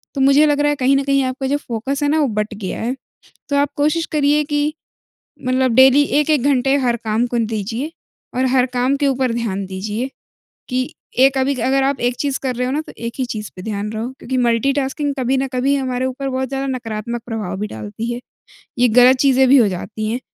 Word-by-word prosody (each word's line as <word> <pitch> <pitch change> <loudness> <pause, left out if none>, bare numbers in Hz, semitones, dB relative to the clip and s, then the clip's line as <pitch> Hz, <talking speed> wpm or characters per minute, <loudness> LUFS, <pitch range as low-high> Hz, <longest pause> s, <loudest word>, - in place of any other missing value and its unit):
तो 275 - -1
मुझे 275 +3 +5
लग 290 -1 +1
रहा 295 - +3
है 290 - +1
कहीं 270 0 +2
न 275 - 0
कहीं 275 0 +2
आपका 260 +1 -3
जो 285 +2 +1
फ़ोकस 270 +2 -3
है 290 - +2
ना, 310 +2 +2
वो 295 - +2
बँट 210 -1 -2
गया 195 -3 -5
है। 245 +3 -1 0.6
तो 285 - +2
आप 285 0 +3
कोशिश 305 +3 +1
करिए, 295 0 +3
कि 295 +1 -1 0.7
मतलब 255 0 +2
डेली 265 +2 +7 0.2
1-1 300 -3 +2
घंटे 270 -1 +2
हर 250 -4 +1
काम 220 +2 +1
को 240 0 -2
दीजिए 225 +6 -3 0.4
और 255 +1 +1
हर 255 -1 +3
काम 250 +2 +1
के 285 0 +1
ऊपर 260 -3 0
ध्यान 205 -5 -2
दीजिए। 210 +7 -4 0.6
कि 255 +1 -2 0.3
एक 270 +1 +5
अभी, 265 +2 +1
अगर 265 +2 +1
आप 275 0 0
एक 245 +1 +1
चीज़ 280 -2 -1
कर 255 -2 -1
रहे 250 +1 -1
हो - - -2
ना, 300 - 0
तो - - -12
एक 235 0 -5
ही 260 - +1
चीज़ 215 -4 -5
पर 180 - -6
ध्यान 210 0 -3
रहो। 220 +3 -3
क्योंकि 260 +1 -3
मल्टी-टास्किंग 270 +4 +1
कभी 260 +1 +1
न 270 - 0
कभी 265 +3 +2
हमारे 260 -2 -1
ऊपर 265 +1 -3
बहुत 260 0 -2
ज़्यादा 270 0 -3
नकारात्मक 235 -2 -4
प्रभाव 215 -5 -4
भी 210 - -2
डालती 110 - -5
है। 240 - -5 0.6
ये 245 - +5
गलत 250 +1 +7
चीजें 265 -1 +4
भी 280 - +7
हो 235 -5 +5
जाती 215 +3 -4
हैं, 245 - -2
260 Hz, 225 wpm, -19 LUFS, 235-275 Hz, 0.7 s, डेली